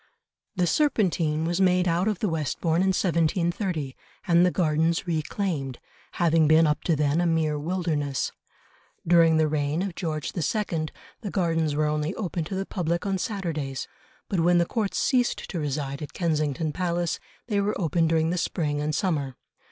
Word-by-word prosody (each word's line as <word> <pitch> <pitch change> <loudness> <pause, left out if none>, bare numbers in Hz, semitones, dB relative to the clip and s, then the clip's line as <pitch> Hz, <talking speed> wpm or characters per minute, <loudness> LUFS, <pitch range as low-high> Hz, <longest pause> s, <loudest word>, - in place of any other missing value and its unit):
The 180 -2 +2
Serpentine 175 - +1
was 175 +3 0
made 180 -1 +3
out 175 +3 +1
of 210 -3 0
the 210 - -1
Westbourne 160 +1 0
in 190 - +2
1730, 170 -3 0 0.3
and 170 0 +5
the 180 - +5
gardens 165 0 +1
reclaimed, 155 -5 -2 0.4
having 165 -2 +3
been 160 +2 +6
up 150 -1 0
to 165 - +3
then 150 +2 +1
a 175 - +2
mere 160 -2 +1
wilderness. 155 -5 -1 0.7
During 165 -1 +5
the 155 -1 +3
reign 150 +3 0
of 195 -3 -3
George 155 -4 -3
II., 170 -2 -1 0.3
the 210 - -4
Gardens 165 -5 0
were 155 +1 +2
only 150 +3 -1
open 180 -5 -3
to 190 - -5
the 195 +1 -2
public 170 -2 -2
on 195 -1 0
Saturdays, 160 - -3 0.4
but 190 - -1
when 175 +1 +4
the 170 - +3
Court 210 +1 -2
ceased 245 -2 +2
to 175 - -3
reside 140 -1 -3
at 150 - -7
Kensington 155 -3 -1
Palace, 175 0 -1 0.3
they 205 -3 0
were 205 +1 -1
open 165 -1 +1
during 160 0 +2
the 180 - 0
spring 150 -4 -1
and 150 0 -1
summer. 145 -9 -1
165 Hz, 170 wpm, -26 LUFS, 155-180 Hz, 0.7 s, been